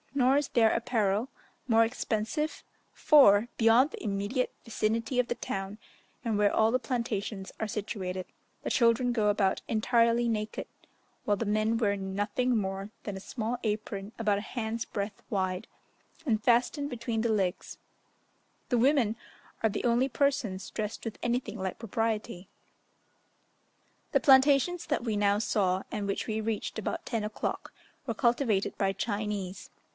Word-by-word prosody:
Nor 265 0 +4
is 290 -1 0
their 225 -2 +4
apparel 225 -1 0 0.4
more 225 -2 +5
expensive; 230 +6 -2 0.3
for, 230 -7 +6
beyond 235 +6 +5
the - - -8
immediate 205 +5 -1
vicinity 230 +2 -1
of 250 - +2
the 240 - -1
town, 195 -1 -4 0.5
and 225 -3 +1
where 205 -1 +3
all 220 0 +4
the 255 - +2
plantations 225 -5 -3
are 220 - -1
situated, 195 -3 -4 0.4
the - - -2
children 240 +1 +3
go 215 -3 +2
about 200 -2 +1
entirely 235 +1 +2
naked, 215 -1 -2 0.6
while 205 -1 +1
the 230 - -2
men 215 +2 +1
wear 205 -3 +1
nothing 205 +6 -1
more 195 -1 -2
than 205 - -4
a - - -5
small 230 +3 -3
apron 210 -2 -3
about 210 -3 +1
a - - -5
hand's 225 +1 -3
breadth 200 0 -4
wide, 190 0 -1 0.6
and 220 -5 +1
fastened 255 +5 +2
between 230 -3 -2
the 230 0 +1
legs: 195 -3 -1 0.9
the 245 - +2
women 245 -3 +3 0.5
are 220 - +4
the 210 - -3
only 240 +3 +3
persons 240 -7 0
dressed 215 +1 -4
with 225 - -5
anything 240 -1 -1
like 190 -1 -3
propriety. 215 -4 -2 1.6
The - - +4
plantations 275 +5 +5
that 295 -6 0
we 225 -3 -1
now 205 0 +3
saw, 190 -3 +1
and 205 -2 -3
which 200 - -2
we 220 0 -1
reached 220 0 -3
about 215 - -4
10 230 -3 -1
o'clock, 210 0 -4 0.4
were 230 - -1
cultivated 235 -4 +1
by 195 -1 +1
Chinese. 205 -2 -3
220 Hz, 150 wpm, -29 LUFS, 205-240 Hz, 1.6 s, for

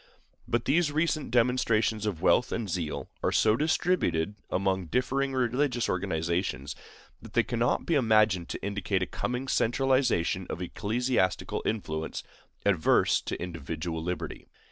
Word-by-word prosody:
But 120 0 0
these 155 +1 +2
recent 155 -1 0
demonstrations 115 -3 +2
of 90 -5 -3
wealth 125 - +4
and 115 -2 -2
zeal 85 -4 -3
are - - +1
so 110 0 +4
distributed 150 - +1 0.2
among 95 -1 0
differing 135 - 0
religious 125 0 +1
organizations 85 -5 -1 0.5
that - - -12
they - - +4
cannot 120 0 0
be 170 - 0
imagined 110 - +3
to - - -5
indicate 100 -1 -1
a - - 0
coming 125 +7 -3
centralization 125 -9 +1
of - - -4
ecclesiastical 105 +1 -1
influence 80 -8 -3 0.4
adverse 95 -6 +3
to - - -5
individual 80 -1 -4
liberty. 90 +2 -5
110 Hz, 130 wpm, -28 LUFS, 90-125 Hz, 0.5 s, wealth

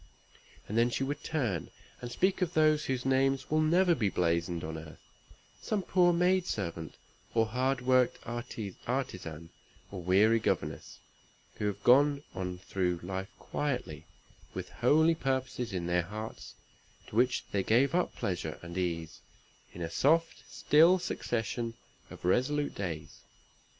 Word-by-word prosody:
And 110 +3 0
then 120 +1 +4
she 130 - -1
would 145 +2 -3
turn 120 - -2 0.3
and 120 -1 -6
speak 190 +8 +1
of 180 -1 -1
those 155 -1 +4
whose 130 -1 -2
names 135 +1 +1
will 155 0 +3
never 175 +3 +4
be 110 -11 +1
blazoned 85 -1 0
on 80 +1 -4
earth 80 -1 -11 0.5
some 205 -3 -1
poor 180 -1 +4
maid 180 +1 +2
servant, 85 -5 -4 0.4
or 115 -1 +4
hard 125 +3 0
worked 130 -1 +3
artisan, 110 - -5 0.4
or 95 -2 -6
weary 100 +6 +4
governess 110 - -2 0.6
who 105 - -1
have 100 0 -4
gone 140 +3 +5
on 90 -1 -4
through 90 -1 -1
life 95 +2 -4
quietly, 145 -4 -3 0.5
with - - -5
holy 160 +2 +4
purposes 130 -5 -2
in 90 -3 -3
their 90 0 +2
hearts, 105 +5 -7 0.5
to - - -11
which 125 +2 +2
they 100 - +1
gave 125 - +3
up 180 0 0
pleasure 90 -4 -3
and 85 +1 -5
ease, 85 -3 -3 0.5
in 85 - -6
a 80 - -4
soft, 160 - +2
still, 165 +5 +5
succession 120 -8 -3 0.3
of - - -10
resolute 145 +9 +1
days. 85 -6 -5
120 Hz, 145 wpm, -31 LUFS, 90-145 Hz, 0.6 s, gone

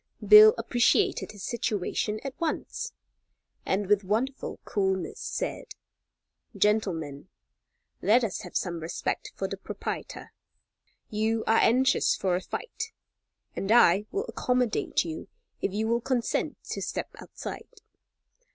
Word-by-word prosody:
Bill 215 +1 +10
appreciated 235 +1 +2
his 205 -2 -10
situation 215 -1 -1
at 275 -1 -4
once, 330 -2 -3 0.8
and 195 +2 +1
with 205 +1 +3
wonderful 230 +8 -2
coolness, 190 -2 -1
said: - - -4 0.8
"Gentlemen, 185 -8 0 0.7
let 235 +4 +4
us 210 -5 -2
have - - -4
some 175 -2 -2
respect 165 +2 -3
for - - -2
the - - -5
proprietor. - - -6 0.8
You 220 +1 0
are 225 - +4
anxious 255 +3 +4
for 185 -2 0
a 180 - -1
fight, 450 - -6 0.6
and 195 - -2
I 210 -3 +5
will 405 +3 -2
accommodate 250 - 0
you 160 -1 -6 0.3
if - - 0
you 215 +3 -1
will 235 +1 +1
consent 245 -1 -1
to - - -3
step - - -3
outside. - - -8
215 Hz, 125 wpm, -28 LUFS, 190-240 Hz, 0.8 s, Bill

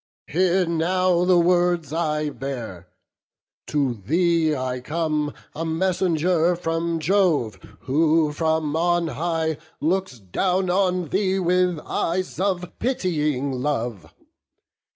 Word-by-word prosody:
Hear 180 +2 +2
now 175 +2 +1
the 180 -1 +5
words 175 -3 +2
I 150 -2 -1
bear; 120 -11 -6 0.8
to 140 -4 0
thee 160 - +1
I 130 -1 -3
come 150 +1 -1 0.2
A 165 - -4
messenger 175 0 +1
from 165 0 -1
Jove, 160 - +1 0.2
who 155 +3 +2
from 160 -1 0
on 175 0 +1
high 160 +1 -1 0.2
Looks 180 -3 -1
down 180 - 0
on 180 -3 +1
thee 190 0 +1
with 180 -1 +2
eyes 180 +2 -2
of 185 -2 -1
pitying 150 - 0
love. 120 - -3
165 Hz, 110 wpm, -23 LUFS, 150-180 Hz, 0.8 s, the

